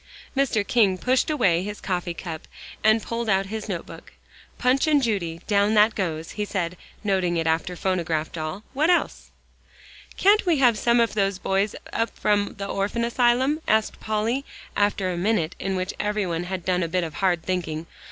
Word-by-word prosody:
Mr. 265 -7 +1
King 200 -6 +3
pushed 255 - +1
away 195 - +2
his 205 +2 -5
coffee 175 -2 -2
cup, 160 -3 -7 0.4
and 220 0 +4
pulled 230 -1 -3
out 195 0 +3
his 215 +2 -6
note - - -3
book. - - -12 0.4
"'Punch 260 +4 +2
and 295 -3 +4
Judy,' 170 -8 -1
down 205 +1 +2
that 215 +1 +5
goes," 165 -5 -3
he 210 - -3
said, 180 -4 -2 0.3
noting 185 -4 +1
it 165 - 0
after 165 +3 0
"phonograph 165 -4 -1
doll." 160 +5 -5
"What 300 +5 +2
else?" 355 - +1 0.9
"Can't 410 +2 +5
we 345 -4 +2
have 245 -4 +5
some 235 +3 +2
of 230 -1 +2
those 195 -2 +1
boys 195 +2 0 0.2
up 230 0 0
from 205 -1 +1
the 200 - -4
Orphan 200 +4 -1
Asylum?" 250 +5 +2
asked 220 0 +1
Polly, 220 +5 -1 0.3
after 200 -2 +1
a 175 - -3
minute 180 -3 +1
in 195 0 -2
which 185 +1 -2
everybody 195 -5 -1
had 180 -1 -5
done 180 -1 +1
a 170 - 0
bit 180 +2 0
of 160 -2 -5
hard 175 0 +1
thinking. 170 -4 -2
200 Hz, 180 wpm, -24 LUFS, 180-230 Hz, 0.9 s, that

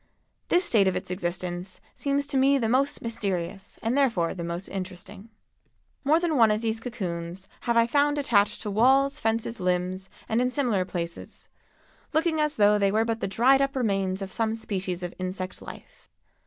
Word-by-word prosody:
This 355 +1 +3
state 205 -4 +3
of 190 - +1
its - - -4
existence 180 0 -4
seems 280 0 -1
to 285 0 -4
me 275 +1 +4
the 230 -4 0
most 265 +5 +1
mysterious 195 -5 -4
and 230 +3 0
therefore 230 -12 +2
the 175 - -6
most 170 +2 -4
interesting. 190 +3 -7 0.7
More 305 +4 +4
than 335 -4 0
one 225 -3 +6
of 215 +1 +1
these 225 0 0
cocoons 185 -6 -5 0.2
have 235 - +3
I 230 - +6
found 290 +4 +2
attached 215 -8 +2
to 210 - -3
walls, 270 +6 +3
fences, 225 0 -1
limbs 185 +1 -1 0.2
and 225 +2 +1
in 250 - +2
similar 245 -9 0
places, 170 -2 -6 0.6
looking 315 0 +2
as 300 0 0
though 210 0 +4
they 200 -1 +3
were 220 +2 +2
but 225 -1 -1
the - - -2
dried 255 +7 +4
up 275 0 0
remains 195 -5 0
of 195 - -7
some 225 +1 0
species 190 -5 -4
of 175 - -4
insect 185 0 -5
life. - - -12
215 Hz, 180 wpm, -26 LUFS, 185-260 Hz, 0.7 s, one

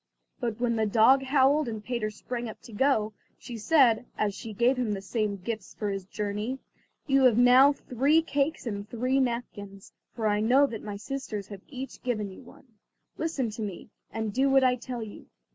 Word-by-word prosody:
But 235 -2 -3
when 235 -1 0
the 220 -1 +1
dog 230 +6 +5
howled, 275 +2 +3
and 220 -2 -5
Peter 235 -4 -2
sprang 240 +2 -5
up 220 - -10
to 230 - -12
go, 220 -3 +1 0.2
she 240 - -9
said, 245 -1 +3
as 210 -1 0
she 225 +2 -8
gave 235 +5 +2
him 245 -4 -1
the 195 - -6
same 210 -1 -1
gifts 210 +1 -6
for 210 -2 -2
his 195 -1 -4
journey: 210 +5 -3 0.5
"You 270 -1 +3
have 240 -3 +5
now 250 +3 +7
three 280 +4 +1
cakes 290 0 -1
and 205 -2 -5
three 255 +3 0
napkins, 210 -6 -4 0.2
for 225 - -3
I 210 -1 +2
know 250 +6 +4
that 230 -5 -5
my 210 -1 -6
sisters 215 -3 -5
have 200 -2 -9
each 265 -1 -8
given 215 -6 -2
you 190 - -12
one. 260 +2 -16 0.5
Listen 280 -8 -1
to 220 - -7
me, 200 0 -6 0.2
and 220 -2 -3
do 270 +4 +2
what 270 0 +5
I 255 -1 +4
tell 245 -1 -6
you. 210 - -11
235 Hz, 195 wpm, -28 LUFS, 210-265 Hz, 0.5 s, now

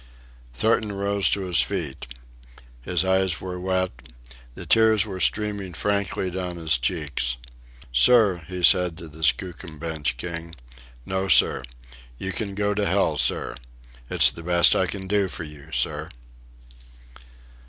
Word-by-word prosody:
Thornton 110 - +1
rose 100 0 +1
to 100 - 0
his 90 -2 +2
feet. 85 -12 -3 0.7
His 90 +8 0
eyes 95 -1 +1
were 90 -1 -6
wet. 95 0 -1 0.6
The - - -8
tears 110 -2 +4
were 95 -3 -6
streaming 100 -3 -1
frankly 100 +1 -1
down 90 -1 -4
his 80 -7 +1
cheeks. 60 -1 -2 0.6
"Sir," 95 - +4
he 90 -1 -6
said 90 -2 +5
to 85 -2 -9
the 80 +1 -13
Skookum 80 +1 -1
Bench 75 -5 -3
king, 85 +3 -6 0.5
"no, 95 +1 -2
sir. 80 -6 +5 0.6
You 95 - -4
can 100 -1 -4
go 105 0 0
to 105 0 0
hell, - - +1
sir. - - +1 0.6
It's - - +4
the 85 - -10
best 85 0 +4
I 95 - +1
can 95 -1 -5
do 100 0 +1
for 90 -1 -7
you, 75 -2 -12
sir." - - -1
90 Hz, 145 wpm, -24 LUFS, 80-100 Hz, 0.7 s, said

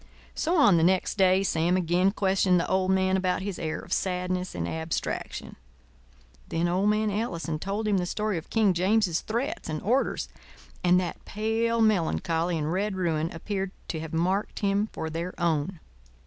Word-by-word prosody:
So, 340 +3 0
on 205 - +6
the 160 - +3
next 185 +2 +2
day, 190 0 +5
Sam 175 -1 +1
again 180 +2 +2
questioned 190 -2 +2
the - - -1
old 190 0 +1
man 190 0 +3
about 185 0 0
his 195 -2 -4
air 155 -1 -2
of - - -5
sadness 180 0 -1
and 85 -1 -2
abstraction. 160 - -4 0.9
Then 165 +1 0
old 185 +4 +2
man 215 0 +1
Ellison 170 -7 -2
told 200 +5 -2
him 200 -2 +2
the 180 - -2
story 210 -2 -1
of 160 - -15
King 215 -4 +3
James's 185 -1 +2
threats 235 - -3
and 155 -1 -2
orders 250 +7 +1 0.6
and 180 0 +5
that 180 -2 -4
pale 225 +2 0
melancholy 170 -4 +1
and 155 +1 -1
red 200 +2 -1
ruin 165 -3 0
appeared 195 +3 -3 0.2
to 160 - -2
have 160 -1 -6
marked 185 +5 -1
him 200 +1 +1
for 160 - -5
their 170 +3 -5
own. 170 +1 0
185 Hz, 175 wpm, -27 LUFS, 170-205 Hz, 0.9 s, on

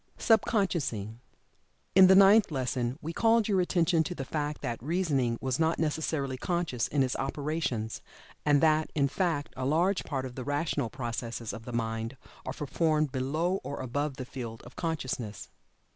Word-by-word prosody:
SUB 225 -3 +4
CONSCIOUSING. 135 - -1 0.7
In 190 0 +8
the 190 - +7
Ninth 200 +2 +7
Lesson 130 -3 -2
we 165 +2 -4
called 225 +2 +3
your 195 -3 +3
attention 170 -2 +2
to 180 - -4
the 135 - -5
fact 150 +1 -3
that 120 -4 -3
Reasoning 140 -6 0
was 130 +1 -1
not 160 +1 +2
necessarily 150 -4 -1
conscious 165 -7 -1
in 140 -2 +2
its 130 - -1
operations, 135 -5 -2 0.4
and 145 -1 +4
that, 155 -1 +3
in 140 -2 +3
fact, 155 -1 -1
a 130 - -4
large 170 +8 +2
part 135 -3 -3
of 130 - -7
the 130 - -6
rational 145 -3 -1
processes 115 -1 -4
of 115 - -8
the 125 - -6
mind 115 +1 -3 0.3
are - - -2
performed 155 0 0
below 155 +9 0
or 140 - -5
above 145 +3 -2
the 130 - -5
field 115 -3 -7
of 120 - -13
consciousness. 130 -10 -3
145 Hz, 170 wpm, -29 LUFS, 125-165 Hz, 0.7 s, In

